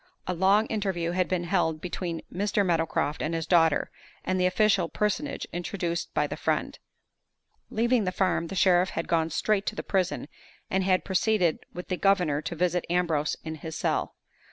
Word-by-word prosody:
A 180 - -1
long 195 +5 +4
interview 190 -7 -1
had 185 0 +1
been 180 -2 -1
held 165 -3 0
between 175 -1 -4
Mr. 205 +2 +1
Meadowcroft 165 -4 0
and 165 +2 -1
his 165 -1 -2
daughter 165 -3 +3 0.3
and 185 0 0
the 180 - +4
official 190 -2 +2
personage 210 +8 -1
introduced 175 -1 -3
by - - +2
the - - -4
friend. - - -1 0.9
Leaving 235 -1 +2
the 185 - 0
farm, 185 -3 0
the 195 - -6
sheriff 185 0 +4
had 165 - -4
gone 165 -1 +1
straight 205 +5 0
to - - -1
the - - -4
prison, 185 -6 -1 0.4
and 190 0 +2
had 185 -1 +2
proceeded 190 -3 +2
with 180 - -8
the 185 - -1
governor 180 -8 +2
to 170 - -5
visit 180 +1 +1
Ambrose 165 -4 +1
in 160 - -5
his 160 +1 -7
cell. - - -1
180 Hz, 180 wpm, -27 LUFS, 165-195 Hz, 0.9 s, long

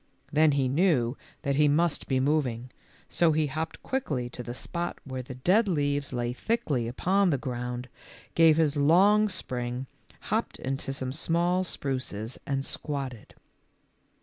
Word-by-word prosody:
Then 155 0 +5
he 135 -2 +2
knew 135 -4 +2 0.3
that 140 -2 0
he 150 0 +5
must 160 +2 +1
be 130 -1 +1
moving, 130 -4 0 0.4
so 165 -2 +3
he 155 0 +2
hopped 155 +3 -4
quickly 145 - -2
to 125 - -6
the 120 0 -6
spot 175 +5 -4
where 130 -2 -5
the 130 +1 -8
dead 190 - +3
leaves 145 -5 0
lay 120 -1 -1
thickly 135 - -1
upon 185 +10 +2
the 145 - +2
ground, 125 -1 -4 0.5
gave 165 -2 +6
his 155 -2 +2
long 195 +9 +5
spring, 125 -7 -4 0.4
hopped - - -1
into 135 0 -3
some 130 -1 -4
small 175 +4 +1
spruces 130 - -4
and 135 -1 -1
squatted. 135 -6 -5
140 Hz, 150 wpm, -28 LUFS, 125-165 Hz, 0.5 s, gave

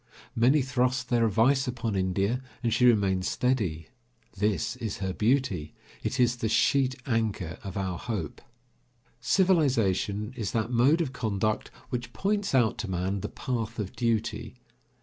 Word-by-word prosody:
Many 130 +5 +4
thrust 130 -1 0
their 115 -2 +3
advice 125 +6 +3
upon 120 -4 -2
India, 95 +6 0 0.2
and 115 -2 +1
she 125 - +4
remains 100 -5 +3
steady. 110 -11 -1 0.5
This 100 -4 0
is 110 -3 -4
her 95 -1 -3
beauty; 115 - 0 0.3
it 130 - -2
is 125 0 +3
the 110 -2 -1
sheet 130 +3 +3
anchor 110 - -1
of 95 -1 -6
our 95 -3 -2
hope. 105 -11 -4 0.8
Civilization 125 - +2
is 105 -6 -3
that 115 +1 -1
mode 135 +8 +4
of 135 -6 -2
conduct 110 -2 -1 0.2
which 120 -1 -4
points 200 -5 0
out 115 -4 +3
to 110 -3 -3
man 95 +2 -1
the - - -4
path 115 -2 -4
of 105 -4 -4
duty. 115 -2 -1
115 Hz, 150 wpm, -28 LUFS, 100-125 Hz, 0.8 s, Many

